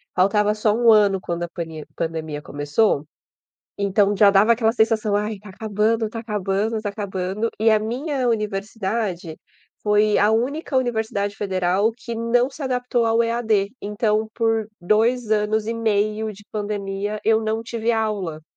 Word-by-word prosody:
faltava 205 Hz, +3 st, +3 dB
só 215 Hz, 0 st, +2 dB
1 230 Hz, 0 st, +5 dB
ano 205 Hz, -3 st, +4 dB
quando 170 Hz, -1 st, -3 dB
a 175 Hz, -, -4 dB
pane 160 Hz, -3 st, -6 dB
pandemia 160 Hz, -2 st, -4 dB
começou. 145 Hz, +3 st, 0 dB, 0.7 s
Então 200 Hz, 0 st, +2 dB
já 200 Hz, 0 st, +6 dB
dava 200 Hz, +4 st, +5 dB
aquela 225 Hz, -1 st, +2 dB
sensação: 220 Hz, -2 st, +2 dB
"Ai 210 Hz, +1 st, -1 dB
está 205 Hz, +2 st, -14 dB
acabando, 215 Hz, +3 st, 0 dB
está 225 Hz, +2 st, -6 dB
acabando, 210 Hz, 0 st, -1 dB
está 215 Hz, -1 st, -3 dB
acabando". 200 Hz, +1 st, -3 dB
E 220 Hz, +1 st, +4 dB
a 215 Hz, -, +5 dB
minha 255 Hz, +4 st, -2 dB
universidade 205 Hz, -5 st, -2 dB, 0.4 s
foi 210 Hz, 0 st, +3 dB
a 210 Hz, -, +4 dB
única 265 Hz, +6 st, -1 dB
universidade 220 Hz, -5 st, -1 dB
federal 190 Hz, +1 st, +1 dB
que 235 Hz, -1 st, -6 dB
não 235 Hz, +3 st, +1 dB
se 290 Hz, -, -9 dB
adaptou 250 Hz, -2 st, 0 dB
ao 225 Hz, +1 st, +3 dB
EAD. 225 Hz, -3 st, 0 dB
Então, 215 Hz, +1 st, 0 dB
por 225 Hz, -2 st, 0 dB
2 220 Hz, +5 st, +1 dB
anos 215 Hz, 0 st, +1 dB
e 230 Hz, -, -1 dB
meio 215 Hz, -1 st, 0 dB
de 205 Hz, +2 st, -16 dB
pandemia, 205 Hz, 0 st, -3 dB
eu 220 Hz, 0 st, +4 dB
não 220 Hz, +1 st, -1 dB
tive 230 Hz, 0 st, -2 dB
aula. 205 Hz, -8 st, -2 dB
215 Hz, 155 wpm, -22 LUFS, 200-225 Hz, 0.7 s, já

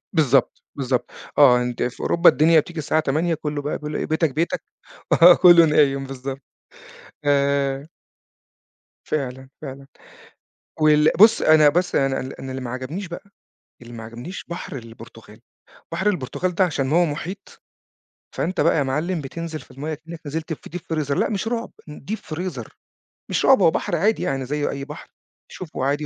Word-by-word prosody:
بالضبط، 140 Hz, -5 st, +2 dB
بالضبط. 130 Hz, -2 st, -1 dB, 0.3 s
آه، 125 Hz, -4 st, +6 dB
أنت 125 Hz, -1 st, -2 dB
في 125 Hz, -, -4 dB
أوروبا 170 Hz, +1 st, +5 dB
الدنيا 160 Hz, +1 st, +4 dB
بتيجي 170 Hz, +2 st, -5 dB
الساعة 155 Hz, +1 st, 0 dB
20:00 160 Hz, +4 st, 0 dB
كله 150 Hz, -1 st, -4 dB
بقى 145 Hz, -, -3 dB
بيقول 150 Hz, 0 st, -6 dB
إيه: -, -, -2 dB
"بيتك، 160 Hz, -2 st, 0 dB
بيتك" 165 Hz, +2 st, -1 dB, 0.6 s
آه، 175 Hz, 0 st, +10 dB
كله 175 Hz, -2 st, +7 dB
نايم، 140 Hz, -3 st, +2 dB
بالضبط. 135 Hz, 0 st, -6 dB, 0.8 s
آآ 140 Hz, 0 st, +1 dB, 1.2 s
فعلًا، 130 Hz, -2 st, -4 dB
فعلًا. 135 Hz, -1 st, -9 dB, 0.9 s
وال 150 Hz, 0 st, +5 dB
بُص، 215 Hz, +2 st, +6 dB
أنا 155 Hz, -1 st, +6 dB
بس 175 Hz, +3 st, 0 dB
أنا 135 Hz, -, +3 dB
أنا 135 Hz, -, -1 dB
ال 130 Hz, +1 st, -8 dB
أنا 135 Hz, -, -7 dB
اللي 130 Hz, 0 st, -5 dB
ما 120 Hz, -, -5 dB
عجبنيش 140 Hz, +10 st, -5 dB
بقى، 175 Hz, -, -8 dB, 0.6 s
اللي 120 Hz, 0 st, -12 dB
ما 115 Hz, -, -8 dB
عجبنيش 120 Hz, +11 st, -8 dB
بحر 170 Hz, -1 st, -6 dB
البرتغال، 115 Hz, -2 st, -13 dB, 0.5 s
بحر 190 Hz, +5 st, -1 dB
البرتغال 180 Hz, +1 st, -2 dB
ده 185 Hz, -, +4 dB
عشان 140 Hz, -5 st, -2 dB
هو 175 Hz, +2 st, +4 dB
محيط، 175 Hz, +6 st, -7 dB, 0.8 s
فأنت 185 Hz, -1 st, -1 dB
بقى 165 Hz, +2 st, +3 dB
يا 145 Hz, -, +3 dB
معلم 155 Hz, +6 st, -2 dB
بتنزل 160 Hz, +3 st, -6 dB
في -, -, -18 dB
المَيَّة 150 Hz, +4 st, -5 dB
كأنك 160 Hz, +2 st, -11 dB
نزلت 160 Hz, +3 st, -4 dB
في 155 Hz, -, -9 dB
Deep 165 Hz, -1 st, -5 dB
freezer 145 Hz, -2 st, -2 dB
لأ، -, -, +1 dB
مش 215 Hz, +1 st, -2 dB
رعب، 235 Hz, 0 st, -3 dB, 0.2 s
ن 150 Hz, -, -10 dB
Deep 220 Hz, -, -1 dB, 0.2 s
freezer 155 Hz, -10 st, -5 dB, 0.6 s
مش -, -, 0 dB
رعب، -, -, +6 dB
هو 165 Hz, -, +5 dB
بحر 175 Hz, -, -2 dB
عادي 210 Hz, +7 st, +1 dB
يعني 135 Hz, -1 st, -2 dB
زي 145 Hz, +2 st, -2 dB
أي 140 Hz, 0 st, -5 dB
بحر، 150 Hz, +2 st, -10 dB, 0.4 s
تشوفه 155 Hz, -7 st, -5 dB
عادي 145 Hz, +2 st, 0 dB
150 Hz, 175 wpm, -22 LUFS, 135-170 Hz, 1.2 s, آه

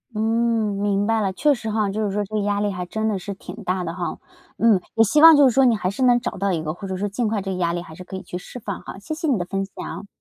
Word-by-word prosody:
嗯， 225 Hz, -1 st, +1 dB
明 205 Hz, 0 st, +1 dB
白 225 Hz, 0 st, +1 dB
了。 195 Hz, -2 st, 0 dB
确 295 Hz, +9 st, +3 dB
实 235 Hz, -4 st, -5 dB
哈， 215 Hz, -1 st, +1 dB
就 215 Hz, +2 st, -2 dB
是 205 Hz, -, -1 dB
说 205 Hz, +1 st, -1 dB
这 205 Hz, -, -16 dB
个 210 Hz, -, +1 dB
压 205 Hz, 0 st, 0 dB
力 205 Hz, 0 st, 0 dB
还 180 Hz, -2 st, -4 dB
真 220 Hz, +3 st, -2 dB
的 205 Hz, -3 st, -1 dB
是 200 Hz, -, -6 dB
挺 180 Hz, -1 st, -10 dB
大 185 Hz, 0 st, -1 dB
的 165 Hz, -1 st, -4 dB
哈。 175 Hz, -1 st, -4 dB, 0.4 s
嗯， 220 Hz, -5 st, +4 dB
也 225 Hz, -, +6 dB
希 295 Hz, +8 st, +3 dB
望 325 Hz, -1 st, +10 dB
就 285 Hz, -2 st, +7 dB
是 250 Hz, -, +2 dB
说 270 Hz, +2 st, +5 dB
你 240 Hz, -2 st, +4 dB
还 195 Hz, -3 st, -1 dB
是 205 Hz, -, -6 dB
能 245 Hz, -1 st, +5 dB
找 245 Hz, -, -3 dB
到 195 Hz, +1 st, 0 dB
一 165 Hz, -3 st, -1 dB
个， 155 Hz, 0 st, -3 dB
或 195 Hz, +3 st, -8 dB
者 190 Hz, -1 st, -3 dB
说 205 Hz, +2 st, -1 dB
尽 220 Hz, +4 st, -1 dB
快 210 Hz, -1 st, -1 dB
这 195 Hz, -, -3 dB
个 185 Hz, -, -3 dB
压 170 Hz, -2 st, 0 dB
力 175 Hz, -, -2 dB
还 160 Hz, -, -12 dB
是 185 Hz, -, -10 dB
可 190 Hz, -, -9 dB
以 -, -, -8 dB
去 -, -, -9 dB
释 250 Hz, -, -10 dB
放 200 Hz, -4 st, -5 dB
哈。 -, -, -9 dB
谢 200 Hz, +10 st, -6 dB
谢 320 Hz, +1 st, -3 dB
你 270 Hz, -6 st, +2 dB
的 175 Hz, -, -2 dB
分 195 Hz, +2 st, -2 dB
享。 200 Hz, +1 st, -8 dB
205 Hz, 355 characters per minute, -22 LUFS, 190-225 Hz, 0.4 s, 望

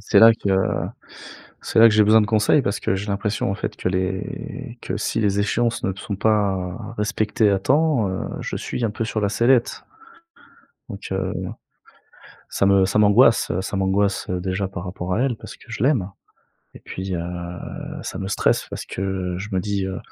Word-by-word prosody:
C'est 105 Hz, -, +3 dB
là 115 Hz, 0 st, +9 dB
que 100 Hz, -, -4 dB, 1.1 s
c'est -, -, -1 dB
là 115 Hz, -, +9 dB
que 105 Hz, -, +1 dB
j'ai 110 Hz, -, +6 dB
besoin 110 Hz, +2 st, +6 dB
de 105 Hz, -, +1 dB
conseils, 110 Hz, +6 st, +3 dB
parce 100 Hz, -, -2 dB
que -, -, 0 dB
j'ai 100 Hz, +2 st, -3 dB
l'impression, 100 Hz, 0 st, -1 dB
en -, -, -1 dB
fait, 100 Hz, -, -4 dB
que -, -, -1 dB
les 95 Hz, 0 st, -4 dB
que -, -, -3 dB
si -, -, -1 dB
les 100 Hz, -2 st, +1 dB
échéances 115 Hz, +3 st, 0 dB
ne 95 Hz, -, +1 dB
sont 100 Hz, +1 st, -5 dB
pas 100 Hz, -1 st, 0 dB
respectées 110 Hz, 0 st, +1 dB
à 100 Hz, -, +2 dB
temps, 140 Hz, -2 st, +2 dB
heu, 95 Hz, -, -3 dB, 0.2 s
je -, -, -4 dB
suis 120 Hz, -, -3 dB
un 110 Hz, -, +1 dB
peu 110 Hz, +2 st, -3 dB
sur 110 Hz, -1 st, -2 dB
la 100 Hz, -, +1 dB
sellette. 120 Hz, +3 st, +2 dB, 1.0 s
Donc, 100 Hz, -3 st, -8 dB
heu, 95 Hz, -, -1 dB, 1.2 s
ça 100 Hz, -, +1 dB
me 100 Hz, -1 st, +5 dB
ça 100 Hz, -, 0 dB
m'angoisse, 105 Hz, +3 st, +5 dB
heu, 85 Hz, -, 0 dB
ça 100 Hz, -, -4 dB
m'angoisse, 100 Hz, +1 st, +1 dB
heu, 90 Hz, -1 st, -1 dB
déjà 95 Hz, +1 st, -2 dB
par 90 Hz, -1 st, -7 dB
rapport 90 Hz, 0 st, -4 dB
à 110 Hz, -, 0 dB
elle, 130 Hz, -4 st, 0 dB
parce -, -, -11 dB
que -, -, -19 dB
je -, -, -4 dB
l'aime, 120 Hz, -8 st, +2 dB, 0.6 s
et -, -, -10 dB
puis, 95 Hz, 0 st, -5 dB
heu, 85 Hz, -, -2 dB, 0.8 s
ça -, -, -6 dB
me 95 Hz, -, -4 dB
stresse 100 Hz, -, +1 dB
parce -, -, -6 dB
que 95 Hz, -2 st, -3 dB
je 100 Hz, +3 st, -6 dB
me 95 Hz, -, +1 dB
dis, 100 Hz, -1 st, -2 dB
heu, 95 Hz, -1 st, -4 dB
100 Hz, 200 wpm, -22 LUFS, 95-110 Hz, 1.2 s, là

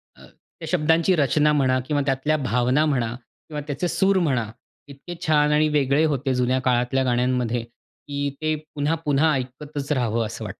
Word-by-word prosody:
अ, -, -, -16 dB
त्या -, -, -14 dB
शब्दांची 165 Hz, +2 st, +2 dB
रचना 150 Hz, 0 st, +2 dB
म्हणा 130 Hz, -3 st, +2 dB
किंवा 145 Hz, -1 st, 0 dB
त्यातल्या 140 Hz, +3 st, 0 dB
भावना 125 Hz, +5 st, +2 dB
म्हणा 125 Hz, -6 st, 0 dB
किंवा 150 Hz, +4 st, -10 dB
त्याचे 145 Hz, +5 st, -2 dB
सूर 190 Hz, +2 st, +2 dB
म्हणा, 125 Hz, -10 st, 0 dB, 0.4 s
इतके 140 Hz, +5 st, -10 dB
छान 150 Hz, -1 st, +3 dB
आणि 150 Hz, +1 st, +3 dB
वेगळे 145 Hz, 0 st, +2 dB
होते 135 Hz, 0 st, -1 dB
जुन्या 125 Hz, +1 st, +1 dB
काळातल्या 125 Hz, +1 st, +1 dB
गाण्यांमध्ये 125 Hz, -1 st, 0 dB
की 140 Hz, +4 st, -7 dB
ते 155 Hz, 0 st, 0 dB, 0.2 s
पुन्हा-पुन्हा 150 Hz, 0 st, +1 dB
ऐकतच 140 Hz, +3 st, -5 dB
राहावं, 115 Hz, -4 st, 0 dB
असं 110 Hz, +1 st, -7 dB
वाटतं. -, -, -8 dB
140 Hz, 160 wpm, -23 LUFS, 125-150 Hz, 0.4 s, छान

